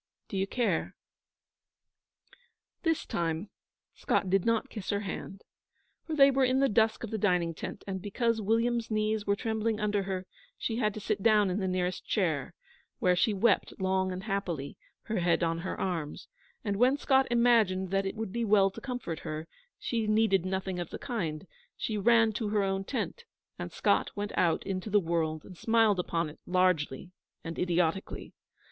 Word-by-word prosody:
D'you 195 Hz, -1 st, -1 dB
care?' 240 Hz, +3 st, -1 dB, 1.9 s
This 325 Hz, -2 st, 0 dB
time 165 Hz, +3 st, -2 dB, 0.4 s
Scott 185 Hz, -, 0 dB
did 195 Hz, -1 st, +3 dB
not 230 Hz, +2 st, +2 dB
kiss 210 Hz, -5 st, -6 dB
her 200 Hz, 0 st, 0 dB
hand, 195 Hz, 0 st, -6 dB, 0.6 s
for 320 Hz, -, -2 dB
they 275 Hz, -2 st, +7 dB
were 270 Hz, 0 st, +2 dB
in 255 Hz, +1 st, +3 dB
the 275 Hz, -, +4 dB
dusk 220 Hz, -1 st, +2 dB
of 230 Hz, -, -5 dB
the 220 Hz, -, -2 dB
dining 180 Hz, -4 st, +2 dB
tent, -, -, -7 dB
and, 190 Hz, -1 st, -4 dB
because 225 Hz, +3 st, 0 dB
William's 230 Hz, +2 st, +1 dB
knees 215 Hz, -1 st, 0 dB
were 200 Hz, -, +3 dB
trembling 220 Hz, 0 st, -1 dB
under 210 Hz, -1 st, +1 dB
her, 190 Hz, -1 st, -3 dB, 0.3 s
she 225 Hz, -, -2 dB
had 215 Hz, -4 st, 0 dB
to -, -, -4 dB
sit 200 Hz, -, -2 dB
down 210 Hz, -3 st, +4 dB
in 185 Hz, -, -1 dB
the 190 Hz, -, -1 dB
nearest 185 Hz, 0 st, -1 dB
chair, 170 Hz, -4 st, -1 dB, 0.4 s
where 180 Hz, -1 st, +3 dB
she 220 Hz, +5 st, +3 dB
wept 205 Hz, +1 st, +1 dB
long 190 Hz, 0 st, +1 dB
and 185 Hz, +1 st, -5 dB
happily, 190 Hz, -9 st, -3 dB, 0.3 s
her 220 Hz, -3 st, -2 dB
head 170 Hz, 0 st, +2 dB
on 165 Hz, 0 st, 0 dB
her 185 Hz, -, -4 dB
arms; 165 Hz, -6 st, -3 dB, 0.4 s
and 200 Hz, -2 st, 0 dB
when 255 Hz, +5 st, +4 dB
Scott 265 Hz, -2 st, +3 dB
imagined 225 Hz, -6 st, +3 dB
that 195 Hz, 0 st, +1 dB
it 195 Hz, -, -4 dB
would 220 Hz, -3 st, -4 dB
be 235 Hz, -, -1 dB
well 200 Hz, -3 st, +4 dB
to -, -, -10 dB
comfort 245 Hz, -, -4 dB
her, 155 Hz, +1 st, -5 dB, 0.3 s
she 225 Hz, -3 st, -2 dB
needed 215 Hz, -4 st, +3 dB
nothing 190 Hz, -1 st, -2 dB
of 175 Hz, -, -4 dB
the -, -, -6 dB
kind; 195 Hz, -, -3 dB, 0.3 s
she 220 Hz, -, -2 dB
ran 225 Hz, +2 st, +4 dB
to 215 Hz, 0 st, -2 dB
her 205 Hz, -1 st, +2 dB
own 195 Hz, 0 st, -1 dB
tent; 260 Hz, -, -3 dB, 0.4 s
and -, -, -5 dB
Scott -, -, +2 dB
went 205 Hz, 0 st, -4 dB
out 170 Hz, -2 st, +2 dB
into 190 Hz, +1 st, -3 dB
the 205 Hz, 0 st, +4 dB
world, 160 Hz, -3 st, -1 dB
and 185 Hz, -, -11 dB
smiled 225 Hz, -4 st, +3 dB
upon 170 Hz, -2 st, -1 dB
it 150 Hz, -, -11 dB
largely 180 Hz, -4 st, +1 dB, 0.3 s
and 165 Hz, 0 st, -5 dB
idiotically. 175 Hz, +1 st, -1 dB
200 Hz, 180 wpm, -30 LUFS, 180-225 Hz, 1.9 s, they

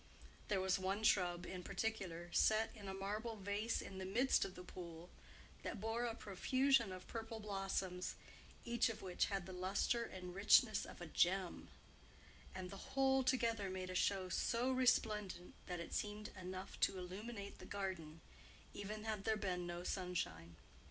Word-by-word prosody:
There 200 Hz, -2 st, +2 dB
was 190 Hz, 0 st, +2 dB
one 195 Hz, +3 st, -1 dB
shrub 180 Hz, -4 st, +3 dB
in 185 Hz, -1 st, -5 dB
particular, 180 Hz, -5 st, -2 dB
set 220 Hz, +1 st, +4 dB
in 205 Hz, -3 st, -8 dB
a 190 Hz, -, -3 dB
marble 210 Hz, +4 st, -2 dB
vase 205 Hz, +3 st, -1 dB
in 190 Hz, -1 st, -7 dB
the -, -, -3 dB
midst 240 Hz, +8 st, +3 dB
of 185 Hz, -, -5 dB
the 180 Hz, -, -8 dB
pool, 170 Hz, -1 st, -8 dB, 0.5 s
that 225 Hz, -, -4 dB
bore 225 Hz, +3 st, 0 dB
a 230 Hz, -1 st, -1 dB
profusion 235 Hz, +3 st, +3 dB
of 185 Hz, 0 st, -7 dB
purple 225 Hz, -1 st, -5 dB
blossoms, 195 Hz, -3 st, -2 dB, 0.5 s
each 235 Hz, -1 st, +3 dB
of 220 Hz, -3 st, -5 dB
which 180 Hz, -2 st, +1 dB
had 195 Hz, -3 st, -2 dB
the 185 Hz, -, -7 dB
lustre 190 Hz, +6 st, +1 dB
and 180 Hz, -5 st, -6 dB
richness 210 Hz, +3 st, +6 dB
of -, -, -10 dB
a -, -, -3 dB
gem; 180 Hz, +3 st, +2 dB, 0.9 s
and 185 Hz, -1 st, -5 dB
the 230 Hz, +7 st, -9 dB
whole 265 Hz, 0 st, +5 dB
together 230 Hz, -6 st, +2 dB
made 185 Hz, 0 st, -3 dB
a -, -, -4 dB
show 190 Hz, 0 st, +2 dB
so 235 Hz, +7 st, +1 dB
resplendent 215 Hz, -7 st, +2 dB
that 180 Hz, -1 st, -3 dB
it 170 Hz, -, -6 dB
seemed 210 Hz, 0 st, -2 dB
enough 185 Hz, 0 st, -6 dB
to 190 Hz, -, +3 dB
illuminate 200 Hz, +3 st, -6 dB
the -, -, -9 dB
garden, 185 Hz, -6 st, -4 dB, 0.5 s
even 210 Hz, +1 st, -5 dB
had 215 Hz, -3 st, -2 dB
there 220 Hz, 0 st, +2 dB
been 180 Hz, -4 st, -1 dB
no 175 Hz, 0 st, -4 dB
sunshine. 85 Hz, -, -2 dB
195 Hz, 165 wpm, -40 LUFS, 180-220 Hz, 0.9 s, richness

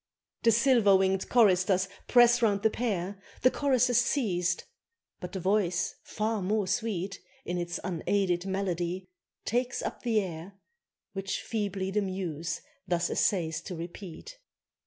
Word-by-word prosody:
The 230 Hz, -, +5 dB
silver 230 Hz, -4 st, +5 dB
winged 190 Hz, 0 st, +1 dB
choristers 190 Hz, -4 st, +4 dB, 0.2 s
press 240 Hz, 0 st, +6 dB
round 205 Hz, -3 st, +2 dB
the 220 Hz, -, +4 dB
pair; 200 Hz, -5 st, -2 dB, 0.2 s
The 255 Hz, -, +6 dB
chorus 265 Hz, -4 st, +2 dB
has 245 Hz, -2 st, +3 dB
ceased; 195 Hz, -9 st, 0 dB, 0.5 s
but 180 Hz, -1 st, -7 dB
a -, -, -1 dB
voice 185 Hz, -1 st, +1 dB
far 215 Hz, 0 st, -2 dB
more 205 Hz, +2 st, 0 dB
sweet 200 Hz, -2 st, -2 dB, 0.3 s
In 175 Hz, 0 st, -2 dB
its 175 Hz, 0 st, -3 dB
unaided 185 Hz, 0 st, 0 dB
melody, 185 Hz, -1 st, -2 dB, 0.4 s
takes 245 Hz, +2 st, 0 dB
up -, -, -4 dB
the 230 Hz, -3 st, +2 dB
air, 180 Hz, -1 st, -5 dB, 0.6 s
Which 195 Hz, -1 st, -3 dB
feebly 200 Hz, -4 st, -2 dB
the 210 Hz, +2 st, +1 dB
muse 170 Hz, -5 st, -3 dB, 0.3 s
thus 170 Hz, -1 st, 0 dB
essays 165 Hz, -5 st, +1 dB
to 185 Hz, -, -6 dB
repeat. 180 Hz, -, -8 dB
195 Hz, 135 wpm, -29 LUFS, 180-220 Hz, 0.6 s, press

